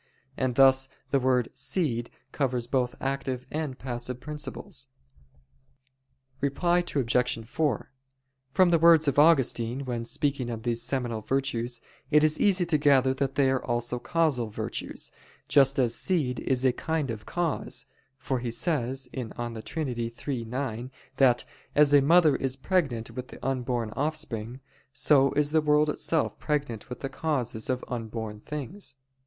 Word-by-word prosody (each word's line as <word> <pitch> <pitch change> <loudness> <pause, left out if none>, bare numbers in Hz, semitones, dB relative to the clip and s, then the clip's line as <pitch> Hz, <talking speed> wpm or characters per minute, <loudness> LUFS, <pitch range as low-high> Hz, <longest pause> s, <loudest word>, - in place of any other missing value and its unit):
And 130 -2 -1
thus 135 0 +5 0.2
the 140 - +3
word 125 -2 +2
"seed" 120 -10 -1 0.2
covers 125 -4 -1
both 125 -1 0
active 135 -1 -2
and 150 -4 -3
passive 125 0 -5
principles. 150 +2 -5 1.5
Reply 170 +6 +2
Obj. 125 -7 0
4: 145 -3 -1 0.6
From 185 +4 +4
the 170 - +4
words 165 -1 +6
of 140 - +3
Augustine 135 -4 +3
when 120 -2 -3
speaking 135 +1 -1
of 115 -2 -5
these 120 -1 0
seminal 120 -3 -2
virtues, 120 -1 -1 0.3
it 150 -1 +5
is 155 0 +2
easy 195 -3 +3
to 160 -3 +1
gather 135 -2 +4
that 135 0 -2
they 135 -2 +3
are 130 - 0
also 120 0 -1
causal 145 -7 +1
virtues, 105 - -4 0.4
just 135 -1 +4
as 120 -3 +2
seed 140 -6 0
is 130 -1 0
a 130 - +4
kind 155 -2 -2
of 110 -1 -8
cause: 175 -4 -2 0.3
for 130 -2 -2
he 120 0 -3
says 130 0 0
(De 120 -2 -5
Trin. 155 +7 -3
iii, 120 +1 -4
9) 125 0 -4 0.3
that, 125 -3 +4 0.3
"as 145 -1 +5
a 145 - +8
mother 160 +1 +5
is 135 -1 -1
pregnant 135 -7 -1
with 125 0 -6
the - - -7
unborn 125 -4 -1
offspring, 135 -4 -3 0.3
so 140 -1 +4
is 150 0 +1
the 160 0 +4
world 150 0 +3
itself 160 0 -1
pregnant 140 -8 -2
with 125 - -7
the 135 - -2
causes 130 -6 -2
of 130 0 -1
unborn 110 -3 -5
things." 150 - -7
130 Hz, 150 wpm, -27 LUFS, 120-150 Hz, 1.5 s, a